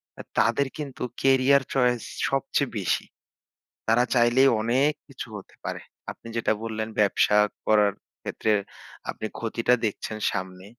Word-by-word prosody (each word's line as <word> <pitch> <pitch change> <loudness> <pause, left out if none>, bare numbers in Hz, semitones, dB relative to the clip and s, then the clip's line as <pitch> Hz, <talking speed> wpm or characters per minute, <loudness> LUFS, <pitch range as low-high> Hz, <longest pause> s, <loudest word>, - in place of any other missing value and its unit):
অ্যা - - -9 0.2
তাদের 140 - +3
কিন্তু 145 -5 -5 0.2
career 135 +1 +5
choice 125 -3 +2 0.3
সবচেয়ে 135 0 0
বেশি। 95 - 0 0.8
তারা 115 +2 +4
চাইলেই 125 +2 +5
অনেক 130 +6 +3 0.2
কিছু 135 -4 -8
হতে 100 - -13
পারে। - - -4 0.3
আপনি - - -13
যেটা 115 - +2
বললেন 110 -1 -3
ব্যবসা 105 0 +4 0.3
করার 105 -2 +4 0.3
ক্ষেত্রে 110 - -1 0.6
আপনি - - -4
ক্ষতিটা 115 +1 +1
দেখছেন 110 0 -3
সামনে। 95 0 -5
120 Hz, 130 wpm, -26 LUFS, 110-135 Hz, 0.8 s, career